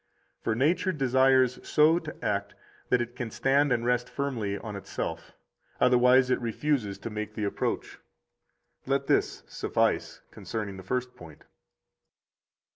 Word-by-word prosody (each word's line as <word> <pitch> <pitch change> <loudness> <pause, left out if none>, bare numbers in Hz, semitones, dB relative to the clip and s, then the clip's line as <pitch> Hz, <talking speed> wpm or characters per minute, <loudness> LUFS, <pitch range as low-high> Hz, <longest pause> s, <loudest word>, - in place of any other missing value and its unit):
For 110 - 0
nature 160 +9 +2
desires 130 -3 +3
so 160 +2 +4
to 155 -3 -9
act 100 -1 -1 0.3
that 125 - +3
it 120 +1 -11
can 120 -2 -4
stand 140 +5 +2
and 120 -1 +1
rest 125 0 +1
firmly 115 -8 -2
on 105 0 -7
itself, 100 -1 -5 0.5
otherwise 125 +1 +5
it - - +1
refuses 115 -3 -1
to 115 - -7
make 105 0 -5
the 110 - -3
approach. 100 - -2 0.9
Let - - +1
this - - +1
suffice - - -1
concerning 105 -3 -5
the - - -8
first 125 +5 -3
point. 80 -4 -13
125 Hz, 135 wpm, -28 LUFS, 105-135 Hz, 0.9 s, otherwise